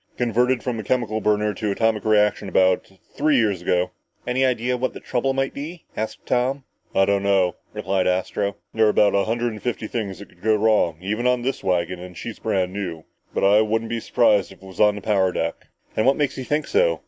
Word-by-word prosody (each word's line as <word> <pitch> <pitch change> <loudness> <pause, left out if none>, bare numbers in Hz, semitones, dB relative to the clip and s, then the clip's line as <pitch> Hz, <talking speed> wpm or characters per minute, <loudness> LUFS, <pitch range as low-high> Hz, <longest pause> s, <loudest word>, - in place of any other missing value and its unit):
Converted 125 +1 +1
from 120 -3 -2
a - - -4
chemical 110 -3 -1
burner 105 0 +1
to 105 +2 -3
atomic 110 +1 +1
reaction 105 -1 +2
about 95 0 +2 0.2
three 150 -1 +2
years 105 -7 +1
ago!" 90 0 +1 0.3
"Any 125 +2 +1
ideas 125 -1 0
what 130 - -1
the - - -6
trouble 130 +2 -1
might 135 0 -1
be?" 160 +4 -7
asked 110 +1 -5
Tom. 130 +2 0 0.3
"I 95 - +5
don't 100 0 +1
know," 95 -3 +2 0.2
replied 95 -1 -1
Astro. 95 +2 -1 0.2
"There 110 -1 +4
are 105 - +1 0.2
a 100 - +3
hundred 120 +1 -1
and 105 -2 -9
fifty 120 -3 -3
things 105 -4 -4
that 100 - -11
could - - -24
go 110 +1 +3
wrong 105 -6 +2
even 110 +6 -1
on 125 -1 +1
this 135 +2 -2
wagon 90 -1 0
and 90 -1 -10
she's - - -7
brand 95 -1 -1
new. 90 -6 -5 0.3
But - - -2
I 100 +2 +6
wouldn't 110 +1 -1
be 115 - -1
surprised 105 -4 +2
if 95 0 -16
it - - -11
was 95 - -12
on 105 -1 +5
the 105 - -7
power 95 -3 +2
deck!" 85 -1 -3 0.3
"And 110 - +2
what 135 - +4
makes 145 -3 0
you 130 - -5
think 150 +3 0
so?" - - +2
110 Hz, 220 wpm, -23 LUFS, 95-125 Hz, 0.3 s, I